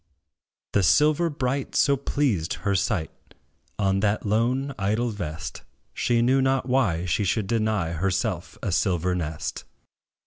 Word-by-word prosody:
The 100 Hz, -, +3 dB
silver 155 Hz, -, +4 dB
bright 140 Hz, -2 st, -2 dB
so 140 Hz, -, +4 dB
pleased 130 Hz, -, 0 dB
her 100 Hz, -, +2 dB
sight, 95 Hz, -3 st, 0 dB, 0.7 s
On 95 Hz, -1 st, +1 dB
that 105 Hz, +2 st, 0 dB
lone, 125 Hz, +6 st, +1 dB
idle 110 Hz, +5 st, 0 dB
vest, 80 Hz, -7 st, -6 dB, 0.3 s
She 120 Hz, -1 st, +1 dB
knew 130 Hz, +2 st, +3 dB
not 130 Hz, -1 st, +1 dB
why 105 Hz, -10 st, +1 dB
she 90 Hz, +4 st, 0 dB
should 100 Hz, +2 st, 0 dB
deny 110 Hz, -5 st, 0 dB
Herself 95 Hz, +2 st, -2 dB
a 100 Hz, -, -1 dB
silver 90 Hz, 0 st, +1 dB
nest. 80 Hz, -3 st, -4 dB
105 Hz, 135 wpm, -25 LUFS, 90-130 Hz, 0.7 s, silver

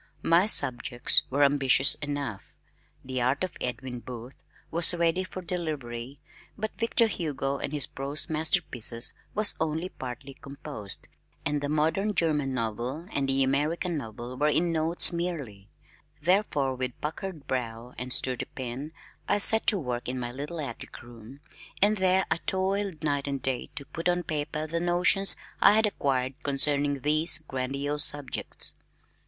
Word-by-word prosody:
My 170 Hz, +4 st, +4 dB
subjects 120 Hz, -, +2 dB
were 140 Hz, +2 st, +2 dB
ambitious 140 Hz, -1 st, +5 dB
enough, 140 Hz, -8 st, -5 dB, 0.5 s
"The 130 Hz, -1 st, -3 dB
Art 130 Hz, +7 st, +1 dB
of 185 Hz, -, -4 dB
Edwin 125 Hz, 0 st, -4 dB
Booth," 120 Hz, +1 st, -9 dB, 0.4 s
was 170 Hz, +1 st, +6 dB
ready 170 Hz, +2 st, +1 dB
for 185 Hz, 0 st, -8 dB
delivery, 140 Hz, -7 st, -5 dB, 0.4 s
but 215 Hz, +1 st, -4 dB
"Victor 230 Hz, 0 st, +2 dB
Hugo 145 Hz, -8 st, -3 dB
and -, -, -4 dB
his 145 Hz, -4 st, 0 dB
Prose 140 Hz, +3 st, 0 dB
Masterpieces," 155 Hz, -, +2 dB, 0.2 s
was 215 Hz, -1 st, +7 dB
only 160 Hz, +3 st, -2 dB
partly 130 Hz, 0 st, -8 dB
composed 140 Hz, -8 st, -5 dB, 0.4 s
and 145 Hz, 0 st, -1 dB
"The 145 Hz, -, -2 dB
Modern 160 Hz, +8 st, 0 dB
German 150 Hz, -5 st, +1 dB
Novel" 125 Hz, -, -3 dB
and 135 Hz, -1 st, -1 dB
"The 135 Hz, 0 st, +3 dB
American 150 Hz, +6 st, 0 dB
Novel" 120 Hz, -2 st, -6 dB
were 150 Hz, -, +3 dB
in 165 Hz, +3 st, +2 dB
notes 165 Hz, +2 st, +3 dB
merely, 140 Hz, -, -5 dB, 0.5 s
therefore 150 Hz, -5 st, +1 dB
with 125 Hz, -1 st, -4 dB
puckered 160 Hz, 0 st, -5 dB
brow 120 Hz, -1 st, -4 dB
and 125 Hz, +1 st, -6 dB
sturdy 125 Hz, 0 st, 0 dB
pen 130 Hz, +4 st, -7 dB, 0.3 s
I -, -, +2 dB
set 220 Hz, +2 st, +5 dB
to 205 Hz, -, +5 dB
work 125 Hz, -7 st, -4 dB
in 130 Hz, -, -3 dB
my 120 Hz, -1 st, -4 dB
little 145 Hz, +6 st, -6 dB
attic 140 Hz, -3 st, -7 dB
room, 120 Hz, +3 st, -13 dB, 0.4 s
and 210 Hz, +2 st, +4 dB
there 190 Hz, 0 st, +3 dB
I -, -, +2 dB
toiled 190 Hz, -2 st, -1 dB
day 145 Hz, -2 st, 0 dB
and 140 Hz, -1 st, -3 dB
night 130 Hz, -2 st, -2 dB
to 140 Hz, -, -6 dB
put 165 Hz, +4 st, -3 dB
on 175 Hz, 0 st, 0 dB
paper 150 Hz, 0 st, -3 dB
the 165 Hz, +2 st, -2 dB
notions 175 Hz, +3 st, +3 dB, 0.3 s
I -, -, +7 dB
had 220 Hz, +1 st, +4 dB
acquired 135 Hz, -7 st, -1 dB
concerning 145 Hz, -1 st, 0 dB
these 155 Hz, +3 st, +5 dB
grandiose 140 Hz, 0 st, -3 dB
subjects. 145 Hz, -3 st, 0 dB
145 Hz, 150 wpm, -27 LUFS, 130-170 Hz, 0.5 s, was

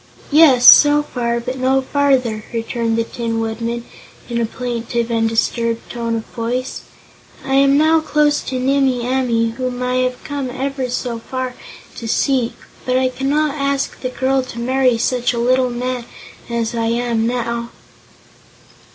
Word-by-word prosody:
"Yes; 285 Hz, -5 st, +6 dB
so 295 Hz, 0 st, +8 dB
far, 235 Hz, -4 st, -2 dB
but 255 Hz, +2 st, -5 dB
no 260 Hz, +1 st, +2 dB
farther," 260 Hz, -5 st, +1 dB
returned 230 Hz, 0 st, -2 dB
the 230 Hz, -, +2 dB
Tin 230 Hz, 0 st, -3 dB
Woodman 230 Hz, +1 st, -3 dB, 0.5 s
in 235 Hz, 0 st, 0 dB
a 230 Hz, -, 0 dB
plaintive 235 Hz, -1 st, -3 dB
and 225 Hz, -1 st, +1 dB
disturbed 230 Hz, +1 st, -1 dB
tone 230 Hz, -1 st, -2 dB
of 225 Hz, -, -4 dB
voice. 245 Hz, +3 st, -4 dB, 0.6 s
"I 270 Hz, -, -2 dB
am 275 Hz, +1 st, +4 dB
now 315 Hz, +2 st, +4 dB
close 300 Hz, -1 st, +1 dB
to 260 Hz, -, -3 dB
Nimmie 260 Hz, -2 st, +1 dB
Amee, 240 Hz, -3 st, +1 dB
whom 250 Hz, -1 st, -3 dB
I 250 Hz, 0 st, 0 dB
have 255 Hz, 0 st, -1 dB
come 285 Hz, -3 st, -4 dB
ever 265 Hz, 0 st, -3 dB
so 240 Hz, -1 st, -3 dB
far 255 Hz, +2 st, -4 dB, 0.4 s
to 230 Hz, -, -6 dB
seek, 250 Hz, +1 st, +1 dB, 0.3 s
but 255 Hz, 0 st, +1 dB
I 260 Hz, 0 st, +2 dB
cannot 280 Hz, +3 st, 0 dB
ask 280 Hz, -1 st, -2 dB
the 255 Hz, -, -2 dB
girl 265 Hz, +1 st, 0 dB
to 255 Hz, -2 st, -9 dB
marry 255 Hz, 0 st, +2 dB
such 245 Hz, +1 st, 0 dB
a -, -, -4 dB
little 255 Hz, +2 st, +2 dB
man 245 Hz, 0 st, -3 dB, 0.4 s
as 235 Hz, -1 st, -2 dB
I 230 Hz, -1 st, -1 dB
am 230 Hz, -1 st, 0 dB
now." 235 Hz, -1 st, -2 dB
250 Hz, 160 wpm, -18 LUFS, 235-265 Hz, 0.6 s, so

